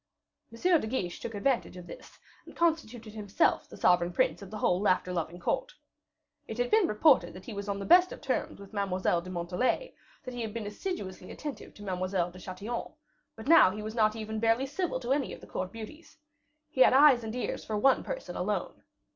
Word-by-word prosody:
M. 330 +8 +2
de - - -4
Guiche 190 -7 -3
took 225 - -6
advantage 230 -1 0
of 180 - -9
this, - - -12 0.3
and - - -12
constituted 250 -10 -1
himself 205 -2 +1
the - - -11
sovereign 175 -1 +3
prince 170 -1 +1
of 200 - -9
the 215 - -6
whole 180 -2 +1
laughter 185 -2 +1
loving 170 0 -3
court. - - -2 0.7
It - - -6
had - - 0
been 430 -4 +5
reported 270 - +4
that 185 - -11
he 235 - -7
was 200 0 -5
on 200 - -1
the 200 - -5
best 360 +1 +6
of - - -8
terms 270 -7 -2
with 200 +1 -12
Mademoiselle 185 -3 0
de 185 - -10
Montalais; 185 - -1 0.3
that 255 - -7
he 245 - -4
had 220 -1 -5
been 225 -2 -3
assiduously 205 - -5
attentive 295 -2 -7
to 205 - -11
Mademoiselle 185 -2 -1
de 185 - -12
Chatillon; 200 +6 -5 0.4
but 220 +3 -10
now 325 - +8
he 210 +3 -6
was 215 0 -5
not 215 -2 +2
even 220 0 -4
barely 225 +4 +2
civil 290 0 -2
to 255 +1 0
any 280 -1 -1
of - - -15
the - - -13
court 185 0 -4
beauties. 230 +11 -10 0.5
He 260 - 0
had - - +7
eyes 270 -3 +7
and 220 +1 -5
ears 250 - -3
for 215 - -3
one 265 +5 +4
person - - -6
alone. - - -2
220 Hz, 215 wpm, -30 LUFS, 185-270 Hz, 0.7 s, now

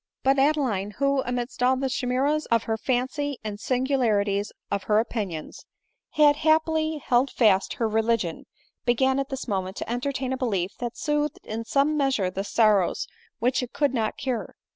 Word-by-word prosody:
But 270 +1 +3
Adeline, 255 -9 +1
who, 275 -1 +2
amidst 245 0 -3
all 255 +1 +4
the 270 +1 -1
chimeras 270 +4 0
of 230 -1 +2
her 225 - -1
fancy 260 +4 -1
and 210 -1 -5
singularities 220 -6 +1 0.2
of 200 - -2
her 210 - +3
opinions, 205 -8 -3 0.5
had 295 -1 +5
happily 315 0 +2
held 260 -1 +2
fast 205 -5 +3
her 230 - -1
religion, 220 -5 0 0.4
began 265 +2 +2
at 275 - -2
this 270 -1 -5
moment 190 -3 -2
to - - -5
entertain 260 +2 -2
a - - -2
belief 200 -8 -1
that 240 -1 -4
soothed 295 0 -1
in 225 +1 -5
some 285 +5 +2
measure 265 -10 +1
the 195 +1 -3
sorrows 210 -3 +2 0.3
which 250 +3 +1
it 250 - -6
could 285 -3 +1
not 220 -4 -1
cure. 255 -4 -3
250 Hz, 165 wpm, -25 LUFS, 215-275 Hz, 0.5 s, had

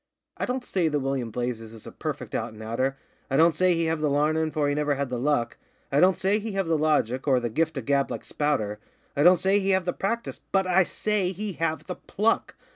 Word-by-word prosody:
'I - - -2
don't 250 0 -2
say 180 -4 +1
that 150 -1 0
William 135 -3 -2
Blazes 115 -1 -4
is 110 - -12
a - - -8
perfect - - -5
out 110 - -3
an' 110 - -11
outer, 130 +5 -1 0.3
I 135 - +1
don't 165 +2 +6
say 180 +3 +3
he 165 0 0
have 160 -1 -1
the 150 - +2
larnin', 155 +2 +1
for 150 -1 0
he 145 - +1
never 150 0 +1
had 140 -1 -2
the 125 -1 -3
luck; 125 -3 0 0.3
I 140 - +3
don't 185 +3 +5
say 200 +3 +2
he 220 0 -5
have 195 -1 0
the 165 0 +1
logic, 150 -4 +1
or 130 -2 +4
the 120 -2 -3
gift 160 +4 0
of 130 - -4
gab, 140 -1 +2
like - - -5
Spouter, 110 -9 -1 0.4
I 140 - +1
don't 180 +4 +7
say 195 +3 +2
he 195 0 -1
have 190 -2 +2
the 180 - 0
practice 230 +4 -3
BUT 190 -1 +2
I 185 0 +4
SAY 200 -2 -1
HE 205 +2 -4
HAVE 165 -1 -2
THE 180 - -6
PLUCK! 220 +3 0
155 Hz, 250 wpm, -26 LUFS, 135-185 Hz, 0.4 s, don't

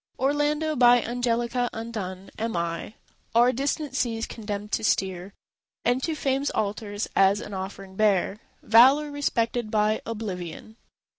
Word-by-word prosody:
Orlando, 295 +3 +1
by 245 -1 +6
Angelica 240 0 -1
undone, 200 -5 -6
Am 225 -4 -2
I; 170 +5 -3 0.4
o'er 240 +2 +6
distant 280 +2 -2
seas 230 -3 -1
condemned 210 -2 -6
to - - -1
steer, 190 -2 -1 0.5
And 245 +2 +2
to 320 +3 -1
Fame's 275 -1 0
altars 205 0 -2
as 195 +1 +4
an 205 - -8
offering 190 0 -7
bear 205 -1 +2 0.2
Valour 270 +7 +6
respected 240 -5 -1
by 215 0 +1
Oblivion. 210 -2 -6
225 Hz, 130 wpm, -26 LUFS, 205-250 Hz, 0.5 s, by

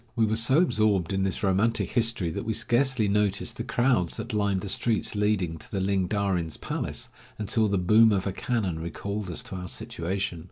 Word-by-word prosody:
We 115 -2 +3
were 110 0 0
so 115 +5 +4
absorbed 105 - +2
in 95 - 0
this 95 0 -1
romantic 100 +4 +1
history 115 -8 +1
that - - -4
we 110 - -1
scarcely 120 -1 +1
noticed 100 -1 0
the 115 - -3
crowds 120 -6 +1
that - - -5
lined 100 -3 +1
the 100 - -5
streets 110 +2 0
leading 105 -6 0
to - - -12
the 100 - -2
Ling 95 -1 +1
Darin's 95 -5 -1
palace, - - -4 0.3
until 110 +1 +1
the 100 -1 +1
boom 110 +5 +5
of 95 -2 0
a 100 - -2
cannon 100 -10 -2
recalled 100 +4 -4
us 85 - -3
to - - -8
our 90 -1 -5
situation. 90 +1 -3
100 Hz, 200 wpm, -27 LUFS, 95-110 Hz, 0.3 s, boom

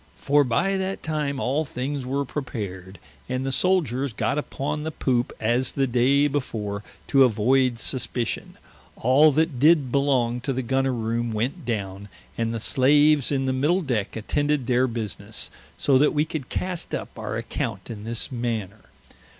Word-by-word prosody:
For 145 +1 +3
by 175 +11 +1
that 190 0 -3
time 150 -3 -2
all 135 +5 0
things 135 -1 -4
were 140 +2 -1
prepared, 100 -9 -6 0.3
and 130 +1 -2
the 135 - -1
Souldiers 140 -6 +1
got 140 - 0
upon 150 0 -3
the 155 - -3
Poope 125 -5 0
as 120 +3 +1
the 135 - +1
day 135 +4 +3
before: 105 -8 -3 0.3
to 135 -1 +6
avoid 125 +2 +3
suspition, 120 -1 -2 0.4
all 140 +6 +5
that 155 -3 +1
did 150 -3 +4
belong 125 -4 +1
to 135 +2 -2
the 130 +1 -2
Gunner 135 +2 +1
roome 115 0 -1
went 125 +9 -2
downe, 100 -3 -4 0.3
and 115 -1 -1
the 115 - -3
slaves 145 +4 +4
in 135 -2 0
the 130 - +1
middle 155 +8 +1
decke 115 -8 -2
attended 145 +5 0
their 125 +1 +2
business, 115 -4 -5 0.3
so 135 -2 +3
that 150 +2 +3
we 150 +1 +3
could 155 -5 -5
cast 180 -2 -3
up - - -7
our - - -3
account - - -4
in 105 -2 -7
this 115 +5 -3
manner. 115 -5 -3
130 Hz, 165 wpm, -24 LUFS, 115-145 Hz, 0.4 s, to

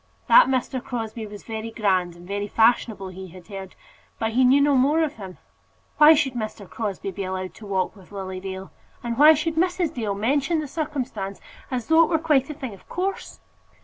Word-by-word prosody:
That - - +7
Mr. 260 -1 -1
Crosbie 225 -3 -5
was 205 0 -10
very 220 0 -5
grand 185 -6 0
and 175 +1 -14
very 205 +1 -3
fashionable 220 -3 +2
he 190 +1 -9
had 180 0 -13
heard, 195 -2 -8 0.4
but 225 0 -1
he 255 +3 +3
knew 260 +3 +6
no 285 0 +4
more 290 +5 +3
of 300 -4 -3
him. 190 -4 -9 0.6
Why 305 +1 +9
should 285 -4 0
Mr. 215 -4 -5
Crosbie 200 -2 -4
be 195 - -5
allowed 185 0 -4
to 215 - -12
walk 190 +1 -1
with 190 -2 -17
Lily 190 -2 -5
Dale? 190 0 -7 0.3
And 235 -1 -2
why 305 +2 +9
should 315 +1 -2
Mrs. 350 -2 +1
Dale 215 -7 -2
mention 275 - +1
the 305 - -4
circumstance 260 -10 -4 0.3
as 250 -3 -3
though 320 +4 +5
it - - 0
were 325 - +3
quite 300 -4 +2
a 300 - -5
thing 265 -7 -6
of 195 - -17
course? 380 +2 -4
225 Hz, 205 wpm, -24 LUFS, 195-290 Hz, 0.6 s, Why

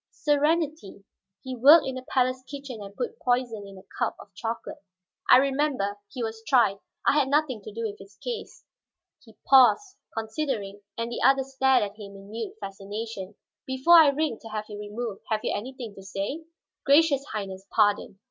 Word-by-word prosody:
"Serenity, 295 - 0 0.4
he 260 -1 -5
worked 290 +6 +7
in 265 - -3
the 255 - -5
palace 255 0 +1
kitchen 275 -6 -7
and 200 0 -10
put 245 - -4
poison 245 -5 -1
in 195 -1 -12
a 190 - -13 0.2
cup - - 0
of - - -14
chocolate." 230 -2 -5 0.5
"I - - +10
remember. 265 -7 0
He 240 +4 -5
was 225 0 -4
tried; 220 -5 +3 0.3
I - - +5
had 290 -2 +3
nothing 280 -5 +1
to 215 - -9
do 230 +2 -5
with 210 -2 -4
his 195 +1 -14
case." 480 -2 -7 0.6
He 225 -3 -19
paused, 270 - +5 0.2
considering; 220 -3 -3 0.2
and 230 +1 -3
the - - -4
other 270 0 +5
stared 265 -2 +2
at 205 0 -6
him 200 -2 -10
in 195 +1 -13
mute 225 0 -5
fascination. 200 0 -6 0.3
"Before 265 +7 +6
I 315 - +7
ring 285 -4 -1
to 225 - -11
have 215 -1 -4
you 205 -1 -7
removed, 210 0 -5
have 215 -1 0
you - - -1
anything 240 0 -6
to 195 - -12
say?" 200 +11 -4 0.4
"Gracious 280 -1 +4
Highness, 195 -6 -6
pardon!" 205 -2 +1
230 Hz, 180 wpm, -26 LUFS, 205-275 Hz, 0.6 s, I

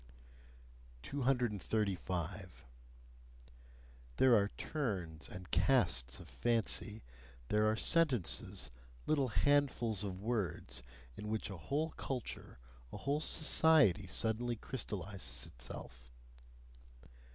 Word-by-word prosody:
235. 105 - -1 1.5
There 130 -2 +6
are 100 -2 +4
turns 95 - -3
and 90 -2 -9
casts 60 -1 +2
of - - -11
fancy, 115 -2 -1 0.5
there 105 0 +3
are 110 - +2
sentences, 130 - +2 0.3
little 140 -4 +2
handfuls 125 -5 +2
of 95 -2 -4
words, 95 - -2 0.3
in 105 - -7
which 110 -1 -2
a 95 - -6
whole 150 - -1
culture, 125 - -5 0.3
a - - -6
whole 140 +3 0
society 150 - +4
suddenly 115 +5 0
crystallises 95 - -3
itself. 60 +1 -9
105 Hz, 90 wpm, -36 LUFS, 90-130 Hz, 1.5 s, There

